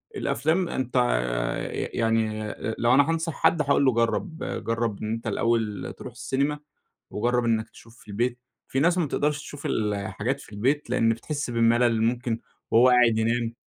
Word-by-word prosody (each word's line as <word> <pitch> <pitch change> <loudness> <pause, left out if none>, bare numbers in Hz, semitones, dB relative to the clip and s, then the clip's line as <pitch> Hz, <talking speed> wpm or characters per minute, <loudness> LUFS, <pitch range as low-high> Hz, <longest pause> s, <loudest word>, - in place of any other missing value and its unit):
الأفلام 175 - 0
أنت 130 -1 -3
ي - - 0
ي - - -5
يعني 110 -1 +1
أ 110 +1 -4
لو 120 +1 +3
أنا 140 +3 +5
هانصح 165 0 -1
حد 160 +2 +2
هاقول 140 -1 +3
له 130 - +5
جرّب، 115 +9 0 0.3
جرّب 115 -3 -1
أنت 115 +2 -3
الأوّل 110 -1 -1
تروح 130 - -8
السينما، 135 +5 -1 0.5
وجرّب 120 +3 0
إنّك 115 -1 0
تشوف 115 +1 -17
في - - -20
البيت. 120 +4 -1 0.3
في 135 - -1
ناس 170 +5 +3
ما 175 - +2
بتقدرش 150 +1 0
تشوف 145 -1 -9
الحاجات 105 +4 -2
في - - -15
البيت؛ 135 +6 0
لأن 115 -2 +2
بتحس 140 +5 -2
بالملل، 115 0 +3
ممكن 120 0 0 0.3
وهو 120 +3 +6
قاعد 120 -3 +5
ينام، 115 +1 0
120 Hz, 165 wpm, -25 LUFS, 115-135 Hz, 0.5 s, وهو